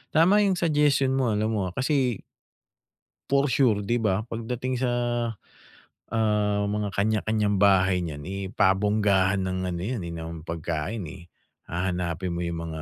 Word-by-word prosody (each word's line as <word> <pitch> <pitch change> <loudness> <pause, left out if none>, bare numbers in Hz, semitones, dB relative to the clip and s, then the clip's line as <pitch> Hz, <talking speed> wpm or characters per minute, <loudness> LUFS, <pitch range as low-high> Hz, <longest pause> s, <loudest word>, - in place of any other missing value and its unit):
Tama 175 +6 +5
'yong 200 -2 +3
suggestion 150 -5 +2
mo 125 -5 +1
alam 110 +1 0
mo, 100 -4 -1
ah, 90 - -8
kasi 130 -5 0 1.1
for 140 0 +3
sure 115 -8 +3
'di 120 +4 0
ba, 105 -2 +1
pagdating 120 +2 -4
sa, 125 -1 0 1.2
ah, 105 -2 +1
mga 105 -1 -2
kanya-kanyang 105 0 +1
bahay 95 -2 +4
niyan, 75 -3 -6
eh, 95 0 -4
pabonggahan 100 -1 +2
ng 95 0 -2
ano 85 - -4
'yan, 110 +3 -3
eh, 85 - -6
ng 80 -1 -7
pagkain, 85 +5 -3
eh. 85 +1 -11 0.4
Hahanapin 90 0 -2
mo 85 0 -3
'yong 85 -1 -3
mga 80 0 -6
105 Hz, 150 wpm, -26 LUFS, 90-120 Hz, 1.2 s, Tama